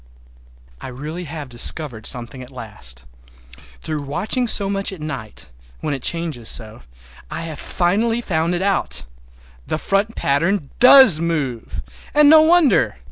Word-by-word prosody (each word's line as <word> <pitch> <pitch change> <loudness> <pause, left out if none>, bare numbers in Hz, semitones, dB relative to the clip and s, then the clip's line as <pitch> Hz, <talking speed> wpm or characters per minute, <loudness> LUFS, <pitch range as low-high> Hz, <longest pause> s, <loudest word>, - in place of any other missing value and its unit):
I - - -7
really 150 +7 -7
have 150 -2 -7
discovered 120 -1 -2
something 125 +1 0
at 125 - -11
last. 100 - -8 0.8
Through 155 -1 -4
watching 200 - -2
so 200 -3 +4
much 195 0 -2
at 190 - -9
night, 135 -8 -7 0.3
when 150 - -2
it 135 - -5
changes 160 -9 -2
so, 110 -2 -2 0.5
I - - -5
have 160 -3 -7
finally 215 +7 0
found 170 -5 -1
out. 195 +2 -1 0.6
The - - -2
front 200 +6 -1
pattern 155 +3 -1
does 250 - +8
move—and 140 - -2
no 315 0 +8
wonder! 315 - +3
160 Hz, 135 wpm, -19 LUFS, 130-195 Hz, 0.8 s, does